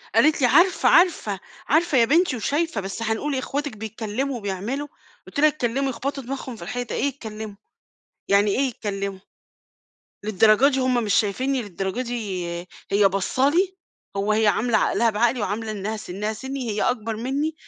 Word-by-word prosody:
قالت 310 -1 +4
لي: 250 - +5
"عارفة، 345 +9 +4
عارفة، 315 - +3 0.3
عارفة 315 -1 +3
يا 235 - +6
بنتي 325 +3 +3
وشايفة، 285 +1 -1
بس 195 +4 -5
هنقول 225 +7 -1
إيه 265 - 0
أخواتِك 280 -2 -3
بيتكلّموا 220 +5 -3
وبيعملوا" 215 +8 -3 0.4
قُلت - - -5
لها 305 - +7
يتكلّموا 275 -2 0
يخبطوا 275 +2 -4
دماغهم 260 0 -5
في - - -14
الحيطة، 245 +7 -4
إيه - - -1
يتكلّموا، 220 -6 -5 0.7
يعني 200 +1 +4
إيه 225 - +1
يتكلّموا؟ 200 -4 -4 1.1
للدرجة 215 +5 +5
دي 265 -2 0
هُم 250 -2 +1
مش 205 - +1
شايفيني، 255 +6 +1
للدرجة 195 +2 -4
دي 215 -7 -3 0.5
هي 200 0 +5
باصّة 195 +8 +1
لي! 370 +4 +1 0.4
هو 200 +2 +1
هي 220 0 +3
عاملة 225 +3 +3
عقلها 230 -1 +2
بعقلي، 235 +3 +1
وعاملة 215 +2 -2
إنها 210 +1 -3
سنها 210 +1 -4
سني 265 +1 -5
هي 210 0 -1
أكبر 225 -3 -1
مني. 275 +7 -1
230 Hz, 165 wpm, -23 LUFS, 210-275 Hz, 1.1 s, لها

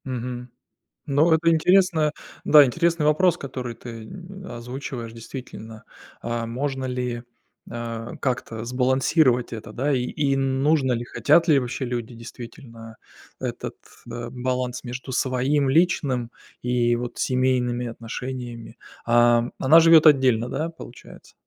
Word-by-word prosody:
Мгм. 125 -1 -5 0.6
Ну, 150 +4 +3
это 165 +1 +4
интересно. 165 -2 +3 0.3
Да, 150 -2 +8
интересный 170 +4 +1
вопрос, 165 +3 +3
который 125 -3 -6
ты, 115 -1 -9
н 190 - -10
озвучиваешь. 120 -2 -7
Действительно, 115 -2 -9 0.4
а 120 0 -3
можно 135 +3 -3
ли, 125 -2 -3 0.5
а, 115 -1 -6
как-то 115 -3 -3
сбалансировать 125 +1 +2
это, 110 -2 -7
да, 135 +6 -1
и 130 -2 +1
и 140 +1 0
нужно 135 +1 +1
ли? 120 0 -2
Хотят 165 +7 +2
ли 150 -3 +6
вообще 125 +1 -3
люди 120 -1 -4
действительно 115 -1 -11 0.4
этот, - - -5 0.3
э, 120 0 -5
баланс 125 0 -3
между 125 +2 -6
своим 130 +3 +1
личным 135 -6 +1 0.3
и 120 -1 +1
вот 120 0 -6
семейными 125 -1 0
отношениями. 120 0 -7 0.3
А 120 0 +4
она 155 +5 +6
живет 165 -1 +7
отдельно, 130 -5 +4
да, 155 +6 -2
получается? 145 -6 -13
125 Hz, 125 wpm, -23 LUFS, 120-145 Hz, 0.6 s, Да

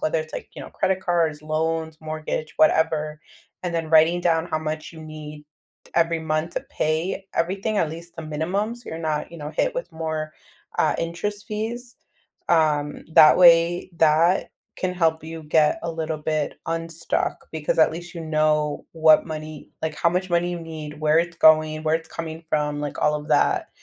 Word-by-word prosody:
whether 155 +1 +1
it's, 155 0 -9
like, - - -6
you - - -8
know, - - -10
credit 190 0 0
cards, 165 -5 0
loans, 160 +1 -2
mortgage, 155 0 -4
whatever, 155 -1 +2 0.4
and 175 -2 -3
then 165 -1 -2
writing 165 +2 +5
down 165 -1 +1
how 155 - -1
much 155 0 -5
you 160 - -11
need 150 -1 -9 0.5
every 165 -1 +2
month 155 +1 -1
to - - -1
pay 165 +5 -1
everything, 195 +5 -1
at 160 - +1
least 170 +1 -10
the 165 - -6
minimum, 175 +9 -2
so 240 - -13
you're 160 - -5
not, 155 -2 -2
you 170 - -9
know, 150 0 -6
hit - - 0
with - - -4
more, 160 -1 -3 0.5
uh, - - +3
interest 200 +5 -3
fees, 235 +3 -4 0.5
um, 150 -3 +2
that 155 - +8
way, 175 0 +5
that 165 +3 +3 0.3
can 185 -1 -1
help 160 -3 +1
you 160 0 -7
get 155 +5 +3
a 170 - -2
little 160 -1 -3
bit 155 0 -2
unstuck 165 0 -2
because 155 -1 -2
at 160 - +6
least 170 +1 -8
you 170 - -6
know 155 -2 +1
what 160 -1 +5
money 155 -1 -7
like, 160 -1 -2
how 170 - +3
much 185 +2 -1
money 175 0 +1
you 175 - -4
need, 155 -2 -8
where 155 +1 +4
it's 170 0 -1
going, 155 -1 +5
where 155 0 +1
it's 160 0 -3
coming 165 0 -6
from, 150 -1 0
like, 145 -1 -4
all 150 - +3
of 150 0 -5
that, - - +2
160 Hz, 185 wpm, -23 LUFS, 155-170 Hz, 0.5 s, that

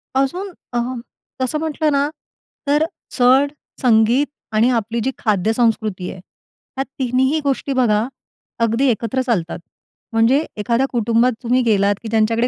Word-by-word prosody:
अजून 350 +9 0 0.2
अ, 240 - +1 0.6
तसं 260 +4 0
म्हटलं 310 -1 0
ना, 280 +1 +2 0.6
तर 295 +3 +3 0.3
चढ 260 +3 +4 0.3
संगीत 240 +3 +4 0.3
आणि 225 +3 +4
आपली, 230 -1 0
जी 265 - 0
खाद्यसंस्कृती 215 -2 0
आहे, - - -10 0.6
ह्या 270 - +1 0.2
तिन्हीही 260 +4 +1
गोष्टी 275 0 -1
बघा, 225 -3 +2 0.6
अगदी 230 +4 +2
एकत्र 235 +3 0
चालतात 180 -11 -1 0.5
म्हणजे 235 +6 +3
एखाद्या, 235 +5 +1
कुटुंबात 235 +1 +2
तुम्ही 250 +2 +2
गेलात, 205 -3 +3
की - - -5
ज्यांच्याकडे 225 +2 +2
240 Hz, 130 wpm, -19 LUFS, 225-270 Hz, 0.6 s, चढ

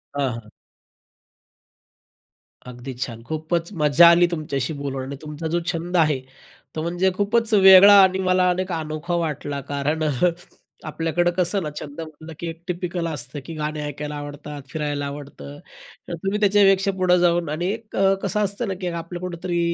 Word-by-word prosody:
हां, 140 -2 0
हां. 115 -2 -9 2.2
अगदी 125 +1 -8
छान. 120 -2 -5
खूपच 160 +4 -2
मज्जा 150 +3 +7
आली 175 +1 +5
तुमच्याशी 150 -3 -2
बोलून 140 -2 -4
आणि 135 +2 -6
तुमचा 155 +1 -6
जो 170 +2 0
छंद 175 +2 -2
आहे 150 -4 +3 0.6
तो 155 - -2
म्हणजे 175 +3 +1
खूपच 225 +2 +1
वेगळा 195 0 +9
आणि 190 0 +2
मला 185 -1 +2
अनेक 185 +1 -1
अनोखा 160 +1 -3
वाटला. 150 -4 -3
कारण, 145 +3 -1
अ, 155 - +1 0.8
आपल्याकडं 165 +2 0
कसं 185 +2 +1
ना, 155 - -3
छंद 145 +2 -9
म्हटलं 160 0 -10
की 170 - -4
एक 165 0 -7
टिपिकल 175 -1 -3
असतं, 145 -2 -5
की 165 - -7
गाणे 155 0 -3
ऐकायला 150 +1 -5
आवडतात, 145 0 -7
फिरायला 145 -2 -3
आवडतं. 140 - -8 0.5
तर - - -5
तुम्ही 195 +2 -1
त्याच्यापेक्षा 195 -1 +4
पुढं 185 -1 +3
जाऊन 175 -2 +2
आणि 155 +3 -2
एक 225 0 -8 0.3
कसं 195 +2 -1
असतं 205 +4 -2
ना, 195 - -1
की 180 - -2
आपल्या 170 +1 -5
कुठेतरी 175 -1 -3
165 Hz, 160 wpm, -22 LUFS, 145-180 Hz, 2.2 s, वेगळा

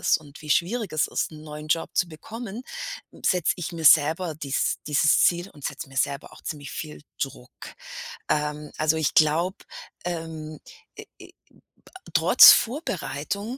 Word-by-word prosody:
ist - - +3
und 150 0 -15
wie 150 - -8
schwierig 200 +5 0
es 155 - +1
ist, - - -2
'n 155 0 -11
neuen 150 0 -9
Job 165 +1 0
zu 180 - +1
bekommen, 225 +7 -8 0.5
hm, - - -17
setze 180 -4 +2
ich 175 -1 -5
mir 165 -1 -6
selber 160 +2 +5
dies 140 -3 -1
dieses 150 +1 +4
Ziel 175 +2 +2
und 145 -2 -16
setze 150 0 -5
mir 135 - -14
selber 140 +2 -2
auch - - -15
ziemlich 145 -2 -6
viel 155 -2 -7 0.2
Druck. 125 -2 -6 0.8
Ähm, 150 0 -2
also, 155 +1 +2
ich 160 -2 0
glaube, 165 +5 +3 0.5
ähm, 160 -3 -5 0.4
äh, - - -9 0.2
äh, - - -12 0.6
ba 370 - -15
trotz - - +9
Vorbereitung 200 - -2
155 Hz, 165 wpm, -25 LUFS, 150-175 Hz, 0.8 s, trotz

